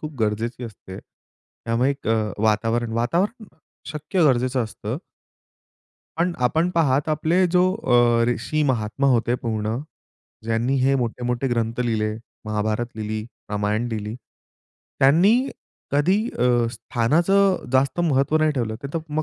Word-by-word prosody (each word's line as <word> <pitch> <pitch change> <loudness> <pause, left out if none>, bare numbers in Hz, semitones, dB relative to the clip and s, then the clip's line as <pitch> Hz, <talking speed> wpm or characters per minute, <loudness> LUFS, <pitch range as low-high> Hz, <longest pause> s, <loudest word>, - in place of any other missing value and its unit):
खूप 155 0 -6
गरजेची 115 +3 -1
असते. 95 -4 -10
त्यामुळे 115 +4 -4
एक 140 -5 -5
अ, 110 -2 +1
वातावरण 115 +2 +1
वातावरण 175 - 0 0.4
शक्य 155 +4 -1
गरजेचं 130 -2 +2
असतं 110 - -5 1.2
पण 175 +2 +1
आपण 160 +8 +2
पहात 145 -2 +2
आपले 160 +4 +2
जो 180 +1 +3
अ, 120 - +3
ऋषी 135 +6 -1
महात्मा 115 +3 -1
होते 120 0 +2
पूर्ण. 110 -2 -2 0.7
ज्यांनी 115 +4 0
हे 135 +1 +3
मोठे-मोठे 125 +1 -1
ग्रंथ 115 -1 -1
लिहिले 110 -3 0 0.3
महाभारत 110 +2 -1
लिहिली, 110 0 -3 0.3
रामायण 105 +3 0
लिहिली. 105 -1 -4 0.8
त्यांनी 195 - +4 0.4
कधी 145 +8 +3 0.2
अ, - - +1 0.3
स्थानाचं 175 +13 +1
जास्त 135 +4 +2
महत्व 150 -2 +2
नाही 155 0 +3
ठेवलं. 115 -6 -2
ते 140 - -4
तर - - +1
मग 155 +1 -1
125 Hz, 130 wpm, -23 LUFS, 115-155 Hz, 1.2 s, त्यांनी